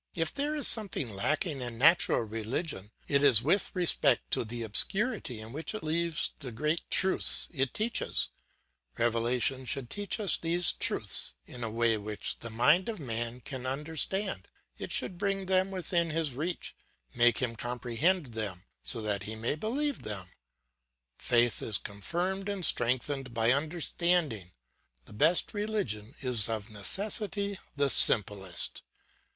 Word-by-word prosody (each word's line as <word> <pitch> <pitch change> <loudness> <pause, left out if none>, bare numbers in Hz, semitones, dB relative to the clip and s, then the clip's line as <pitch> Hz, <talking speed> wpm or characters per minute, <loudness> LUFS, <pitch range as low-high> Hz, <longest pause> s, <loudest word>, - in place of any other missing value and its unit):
If 165 -1 -2
there 290 +2 -2
is 295 - +5
something 190 - +7
lacking 145 - -1
in 120 -2 -5
natural 160 0 +4
religion, 110 - -4 0.2
it 140 -1 +1
is 130 -6 +5
with 180 +7 +1
respect 180 -2 +1
to - - +1
the 115 +1 -6
obscurity 150 - 0
in 110 +2 -10
which 160 +8 -4
it 215 - -7
leaves 165 +1 0
the 135 -5 -7
great 150 +8 -2
truths 190 -1 +9
it 135 -4 -1
teaches; 225 +2 -2 0.7
revelation 120 +3 0
should 130 -1 -4
teach 205 0 -3
us 200 -5 +2
these 170 +1 +2
truths - - +1
in 120 - -8
a 115 - -3
way 115 0 +1
which 105 0 -5
the 115 - -8
mind 150 - +2
of 220 - -5
man 120 -2 -4
can 130 0 -6
understand; 150 - -3 0.3
it - - -8
should 175 - -1
bring 195 -1 -2
them 190 0 +1
within 175 -3 -1
his 155 -3 -1
reach, 165 +7 -5 0.4
make 120 -2 +3
him 120 -3 -2
comprehend 125 +6 -2
them, 100 -5 -5 0.2
so 115 -3 -1
that 105 -2 -2
he 110 - -5
may 115 +4 -2
believe 265 - -3
them. 95 -4 -7 0.9
Faith 120 -1 +1
is 105 -4 0
confirmed 175 - -4
and 195 -4 -2
strengthened 130 +1 -1
by 115 +1 +2
understanding; 155 - 0 0.5
the - - -15
best 170 - +1
religion 195 - -4
is 120 -5 0
of 110 -1 -5
necessity 200 - -2 0.2
the 140 -1 +1
simplest. 95 -6 0
135 Hz, 145 wpm, -29 LUFS, 115-180 Hz, 0.9 s, truths